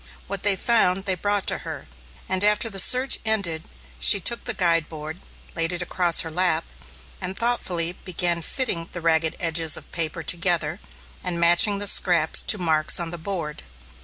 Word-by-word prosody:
What 200 0 -6
they 205 -1 +1
found, 195 -3 +2
they 190 - +2
brought 205 +2 -1
to - - -1
her, - - -8 0.4
and 190 +1 -1
after 210 +2 +2
the 195 - -2
search 255 +7 +5
ended 200 -8 -1 0.4
she 130 - +4
took 235 +5 -1
the 245 - -2
guide 165 -4 +1
board, 155 +2 -8 0.3
laid 165 +1 -1
it 175 0 -4
across 175 -1 +2
her 160 - -6
lap, 165 -1 +1 0.6
and 185 +1 -3
thoughtfully, 180 -8 0
began 175 -1 -1
fitting 170 - -2
the 175 - -6
ragged 160 -1 0
edges 165 -2 +1
of - - -8
paper 165 -1 -4
together 175 +1 -1 0.4
and 175 -2 -3
matching 175 +4 +4
the 205 - -3
scraps 175 -5 +3
to 215 - +1
marks 160 -4 +1
on 170 -1 -2
the 175 - -7
board. 165 -4 -5
175 Hz, 175 wpm, -23 LUFS, 165-200 Hz, 0.6 s, search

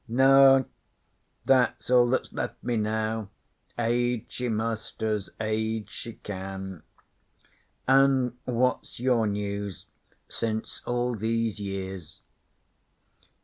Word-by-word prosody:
'No. 135 +2 +6 0.8
That's 125 -2 +2
all 125 -1 +6
that's 130 - -1
left - - -4
me 120 -1 0
now. 110 -1 -1 0.5
Age 120 0 +1
she 125 -1 -3
must 110 0 -3
as 105 -3 -1
Age 110 -1 -1
she 115 - -7
can. 95 -3 -7 1.1
An' 135 -2 +4
what's 125 0 0
your 120 -3 +2
news 100 -1 -3 0.4
since 110 -1 -3
all 120 0 0
these 115 0 -1
years?' 95 -4 -6
110 Hz, 100 wpm, -27 LUFS, 105-125 Hz, 1.1 s, No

